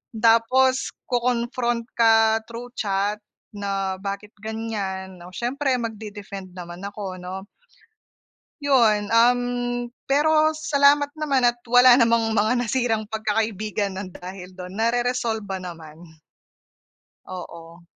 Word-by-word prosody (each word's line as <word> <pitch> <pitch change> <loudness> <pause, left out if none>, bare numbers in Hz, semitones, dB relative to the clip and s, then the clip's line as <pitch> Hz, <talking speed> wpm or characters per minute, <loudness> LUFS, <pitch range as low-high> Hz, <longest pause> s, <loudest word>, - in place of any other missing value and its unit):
Tapos 235 +4 +3 0.2
ko-confront 240 -1 0
ka 225 -1 +4
through 235 +1 -8
chat 205 0 -1 0.4
na 195 -1 -2
bakit 200 +1 -5
ganiyan, 200 -4 -4
'no. 175 +1 -12
Siyempre 260 +6 -1
magde-defend 205 -4 -7
naman 175 -1 -8
ako, 200 -2 -6
'no. 190 +2 -7 1.2
'Yon, 225 -7 +3
um, 240 +2 +5 0.6
pero 310 +2 +3
salamat 285 -1 +3
naman 280 -4 +1
at 240 0 +1
wala 245 +1 +7
namang 230 -2 +3
mga 215 +4 +3
nasirang 230 -2 0
'pagkakaibigan 215 -2 -1
nang 185 -2 -6
dahil 185 0 -9
do'n 180 +1 -9
nareresolba 230 -3 0
naman. 165 -2 -10 1.1
Oo. 170 -2 -9
220 Hz, 105 wpm, -23 LUFS, 195-245 Hz, 1.2 s, wala